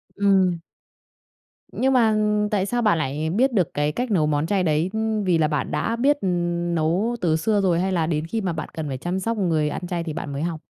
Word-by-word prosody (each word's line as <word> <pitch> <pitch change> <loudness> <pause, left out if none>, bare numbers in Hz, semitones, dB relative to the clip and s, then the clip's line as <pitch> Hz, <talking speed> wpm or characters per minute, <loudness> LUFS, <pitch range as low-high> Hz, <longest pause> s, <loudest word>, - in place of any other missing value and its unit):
Ừm. 190 -4 +2 1.1
Nhưng 265 +1 +1
mà 225 -4 +4 0.4
tại 200 -3 +1
sao 240 +4 -1
bạn 210 -7 +3
lại 155 +1 -2
biết 245 +10 +2
được 185 -7 +1
cái 145 +1 0
cách 245 +9 -3
nấu 170 -7 +3
món 150 0 0
chay 195 0 +1
đấy? 160 +1 +1
Ưm, 220 -1 -1
vì 180 -3 +2
là 155 -1 +2
bạn 150 -2 -2
đã 230 - -1
biết 280 +5 +2 0.6
nấu 170 +9 0
từ 165 -3 +2
xưa 205 +6 +1
rồi 175 -3 +2
hay 190 +2 0
là 165 -4 0
đến 155 -1 -1
khi 220 +6 -2
mà 185 -4 -1
bạn 160 - -5
cần 160 -2 -4
phải 135 -2 -4
chăm 175 +7 -3
sóc 230 +4 -2
người 160 -6 +1
ăn 175 +4 -5
chay 175 -1 -2
thì 160 -2 -5
bạn 145 - -5
mới 140 - -3
học? 165 -2 -3
180 Hz, 235 wpm, -23 LUFS, 155-210 Hz, 1.1 s, mà